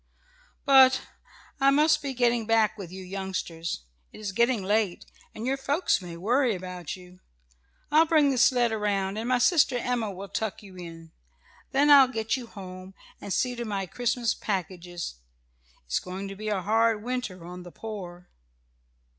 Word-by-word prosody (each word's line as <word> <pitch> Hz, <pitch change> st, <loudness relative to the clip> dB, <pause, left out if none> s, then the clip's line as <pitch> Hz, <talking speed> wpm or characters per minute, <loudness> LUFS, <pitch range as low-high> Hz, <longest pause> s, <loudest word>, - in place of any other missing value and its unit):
"But 260 Hz, -2 st, +6 dB, 0.6 s
I 275 Hz, 0 st, +5 dB
must 300 Hz, +3 st, +4 dB
be 275 Hz, -2 st, -4 dB
getting 240 Hz, -2 st, +2 dB
back 220 Hz, -2 st, +3 dB
with 195 Hz, -5 st, -8 dB
you 190 Hz, 0 st, -8 dB
youngsters. 180 Hz, -, -4 dB, 0.3 s
It -, -, -12 dB
is 210 Hz, -2 st, -4 dB
getting 235 Hz, +1 st, +2 dB
late 205 Hz, -2 st, 0 dB, 0.3 s
and 220 Hz, -, -5 dB
your 270 Hz, +2 st, 0 dB
folks 285 Hz, -, +1 dB
may 175 Hz, -2 st, -8 dB
worry 235 Hz, +5 st, +2 dB
about 180 Hz, -3 st, -6 dB
you. 180 Hz, 0 st, -15 dB, 0.7 s
I'll 315 Hz, +2 st, +5 dB
bring 305 Hz, -4 st, +4 dB
the 255 Hz, -, 0 dB
sled 240 Hz, -1 st, +4 dB
around, 205 Hz, -2 st, -1 dB
and 230 Hz, +3 st, -3 dB
my 255 Hz, -, +4 dB
sister 275 Hz, -1 st, +4 dB
Emma 245 Hz, -2 st, -1 dB
can 195 Hz, +1 st, -8 dB
tuck 220 Hz, -1 st, -3 dB
you 195 Hz, -2 st, -13 dB
in. 165 Hz, -2 st, -10 dB, 0.6 s
Then 285 Hz, +2 st, +4 dB
I'll 275 Hz, -2 st, +9 dB
get 225 Hz, -2 st, -1 dB
you 250 Hz, -3 st, -6 dB
home, 185 Hz, -2 st, -10 dB, 0.3 s
and 200 Hz, -, -7 dB
see 250 Hz, +5 st, +1 dB
to 240 Hz, -, -4 dB
my 200 Hz, -4 st, -2 dB
Christmas 235 Hz, +3 st, 0 dB
packages. 175 Hz, -, -4 dB, 0.7 s
It's -, -, 0 dB
going 190 Hz, +2 st, -6 dB
to 195 Hz, -, -7 dB
be 215 Hz, +2 st, -5 dB
a 195 Hz, -3 st, -1 dB
hard 225 Hz, +1 st, +2 dB
winter 240 Hz, -8 st, -4 dB
on 180 Hz, +1 st, -8 dB
the 175 Hz, 0 st, -11 dB
poor." 180 Hz, -5 st, -8 dB
215 Hz, 170 wpm, -27 LUFS, 185-245 Hz, 0.7 s, I'll